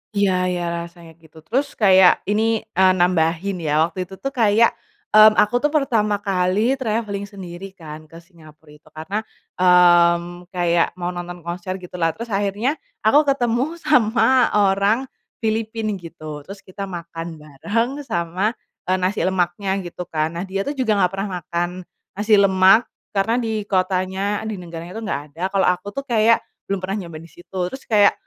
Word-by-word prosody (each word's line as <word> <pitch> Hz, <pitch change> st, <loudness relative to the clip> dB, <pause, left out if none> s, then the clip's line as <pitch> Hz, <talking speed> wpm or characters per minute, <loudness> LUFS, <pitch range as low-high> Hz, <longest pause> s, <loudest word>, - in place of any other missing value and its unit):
Iya 200 Hz, -1 st, +3 dB, 0.2 s
iya 180 Hz, -1 st, -2 dB, 0.2 s
rasanya 170 Hz, -1 st, -14 dB
gitu 160 Hz, -1 st, -20 dB
terus 270 Hz, -, -2 dB
kayak 190 Hz, -3 st, +5 dB
ini, 220 Hz, +1 st, +1 dB, 0.2 s
eee, 190 Hz, 0 st, +6 dB
nambahin 175 Hz, +1 st, +1 dB
ya 155 Hz, -1 st, +2 dB
waktu 185 Hz, +1 st, -6 dB
itu 190 Hz, -, -10 dB
tuh 275 Hz, +8 st, -5 dB
kayak, 230 Hz, -3 st, +3 dB, 0.4 s
mmm, 215 Hz, 0 st, +8 dB
aku 210 Hz, +3 st, +3 dB
tuh 295 Hz, -, +2 dB
pertama 235 Hz, -9 st, +1 dB
kali 200 Hz, +6 st, +1 dB
travelling 215 Hz, -4 st, -2 dB
sendiri 190 Hz, -1 st, -9 dB
kan 155 Hz, -3 st, -10 dB
ke 165 Hz, -, -17 dB
Singapura 160 Hz, -3 st, -18 dB
itu 150 Hz, 0 st, -19 dB
karena, 160 Hz, +7 st, -4 dB, 0.4 s
mmm, 175 Hz, -1 st, +4 dB
kayak 170 Hz, -1 st, +1 dB
mau 180 Hz, -1 st, -3 dB
nonton 175 Hz, -1 st, -7 dB
konser 175 Hz, +2 st, -5 dB
gitulah 175 Hz, -3 st, -3 dB
terus 230 Hz, 0 st, -7 dB
akhirnya 205 Hz, +8 st, -1 dB, 0.2 s
aku 290 Hz, +7 st, +4 dB
ketemu 260 Hz, +3 st, 0 dB
sama 245 Hz, -3 st, +4 dB
orang, 200 Hz, +4 st, +3 dB, 0.4 s
Filipina 220 Hz, 0 st, -1 dB
gitu 155 Hz, -3 st, -9 dB
terus 195 Hz, 0 st, -10 dB
kita 195 Hz, +1 st, -7 dB
makan 170 Hz, -2 st, -7 dB
bareng 205 Hz, -, -3 dB
sama, 185 Hz, +3 st, -1 dB, 0.3 s
eee, 185 Hz, -, +2 dB
nasi 185 Hz, +2 st, -1 dB
lemaknya 190 Hz, +1 st, 0 dB
gitu 175 Hz, 0 st, -7 dB
kan 155 Hz, -1 st, -1 dB
nah -, -, -2 dB
dia 195 Hz, +1 st, -2 dB
tuh 285 Hz, -, -3 dB
juga 255 Hz, -7 st, 0 dB
nggak 180 Hz, -, +2 dB
pernah 195 Hz, +1 st, -3 dB
makan, 175 Hz, +2 st, -2 dB, 0.5 s
nasi 210 Hz, +1 st, +3 dB
lemak 195 Hz, +3 st, +5 dB, 0.2 s
karena 210 Hz, +3 st, +1 dB
di 220 Hz, -2 st, -3 dB
kotanya 190 Hz, +1 st, 0 dB
di 220 Hz, -, -3 dB
negaranya 170 Hz, -1 st, -8 dB
tuh 225 Hz, -, -5 dB
nggak 205 Hz, -9 st, -2 dB
ada 165 Hz, -, -10 dB
kalau 195 Hz, -1 st, +2 dB
aku 180 Hz, +2 st, 0 dB
tuh 275 Hz, +6 st, -5 dB
kayak 230 Hz, -1 st, +4 dB, 0.3 s
belum 195 Hz, -1 st, -1 dB
pernah 190 Hz, +1 st, -2 dB
nyoba 165 Hz, -2 st, -9 dB
disitu 175 Hz, +2 st, -12 dB
terus 265 Hz, -, -9 dB
kayak, 205 Hz, -2 st, +5 dB
190 Hz, 165 wpm, -21 LUFS, 175-215 Hz, 0.5 s, mmm